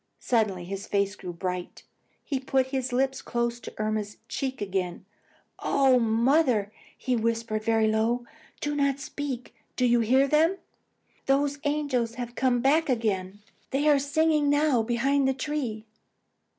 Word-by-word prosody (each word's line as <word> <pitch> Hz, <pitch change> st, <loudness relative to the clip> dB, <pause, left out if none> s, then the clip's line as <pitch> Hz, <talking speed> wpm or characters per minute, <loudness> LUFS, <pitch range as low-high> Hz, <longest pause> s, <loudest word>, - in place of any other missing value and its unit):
Suddenly 210 Hz, -7 st, 0 dB
his 195 Hz, +2 st, -6 dB
face 200 Hz, 0 st, 0 dB
grew 180 Hz, -2 st, -7 dB
bright. 180 Hz, +1 st, -5 dB, 0.4 s
He 275 Hz, -3 st, -2 dB
put 265 Hz, 0 st, +1 dB
his 260 Hz, -1 st, -1 dB
lips 265 Hz, +2 st, 0 dB
close 235 Hz, 0 st, -2 dB
to -, -, -9 dB
Irma's 215 Hz, -1 st, -2 dB
cheek 265 Hz, -1 st, -3 dB
again. 190 Hz, -3 st, -3 dB, 0.5 s
"Oh, 265 Hz, -2 st, +3 dB
mother!" 230 Hz, -1 st, +2 dB, 0.3 s
he 255 Hz, -2 st, -1 dB
whispered 230 Hz, -1 st, -1 dB
very 225 Hz, -1 st, +2 dB
low, 225 Hz, +3 st, +1 dB, 0.4 s
"do 295 Hz, -, -1 dB
not 280 Hz, -1 st, +1 dB
speak. 275 Hz, -3 st, -5 dB, 0.2 s
Do 250 Hz, -, +1 dB
you 240 Hz, -1 st, +4 dB
hear 260 Hz, +5 st, +3 dB
them? 320 Hz, +6 st, +3 dB, 0.7 s
Those 280 Hz, +1 st, +2 dB
angels 285 Hz, -6 st, 0 dB
have 240 Hz, -1 st, -5 dB
come 245 Hz, -1 st, +1 dB
back 300 Hz, +4 st, +3 dB
again. 205 Hz, -5 st, -1 dB, 0.3 s
They 285 Hz, +3 st, 0 dB
are 290 Hz, -2 st, +5 dB
singing 300 Hz, +1 st, +2 dB
now 290 Hz, -4 st, +3 dB
behind 265 Hz, +4 st, +1 dB
the 265 Hz, -, +1 dB
tree." 260 Hz, -6 st, -3 dB
245 Hz, 145 wpm, -27 LUFS, 220-275 Hz, 0.7 s, are